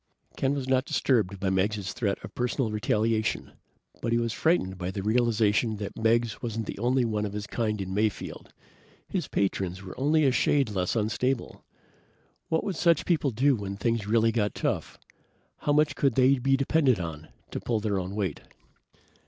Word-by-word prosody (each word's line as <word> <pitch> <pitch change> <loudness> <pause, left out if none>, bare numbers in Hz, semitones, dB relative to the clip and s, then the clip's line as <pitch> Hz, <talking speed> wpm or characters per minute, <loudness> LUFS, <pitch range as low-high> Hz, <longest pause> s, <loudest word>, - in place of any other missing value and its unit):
Ken 135 +1 0
was 135 -2 -3
not 130 0 +2
disturbed 115 -10 +1
by 95 0 0
Meggs' 95 0 0
threat 100 -5 -1
of - - -9
personal 125 -1 -1
retaliation, 110 +1 0 0.5
but 115 - -1
he 115 - +3
was 115 -1 -1
frightened 105 - +1
by 90 0 -3
the 95 0 -4
realization 110 -1 +2
that 100 -1 -6
Meggs 115 0 +1
wasn't 115 -2 -3
the - - -6
only 125 +2 +2
one 105 -2 -1
of 100 -1 -3
his 105 0 -4
kind 105 -1 -2
in 95 -1 -4
Mayfield. 105 0 -2 0.6
His - - -2
patrons 95 -1 -1
were 95 - -8
only 150 +3 +3
a 135 - +4
shade 135 -2 +2
less 90 0 -1
unstable. 115 +4 -1 0.9
What 160 - +1
would 195 -5 -3
such 170 -2 +3
people 160 -5 +2
do 135 +4 +3
when 100 -2 -5
things 115 0 -1
really 115 +1 +3
got 105 -2 0
tough? - - -2 0.6
How 145 - -1
much 150 -1 +3
could 135 -5 +1
they 130 +1 +4
be 135 +2 +2
depended 135 - +2
on 80 -3 -6 0.2
to - - -3
pull 115 -2 -1
their 105 -2 -1
own 95 +2 -5
weight? 95 -8 -2
110 Hz, 180 wpm, -27 LUFS, 100-130 Hz, 0.9 s, a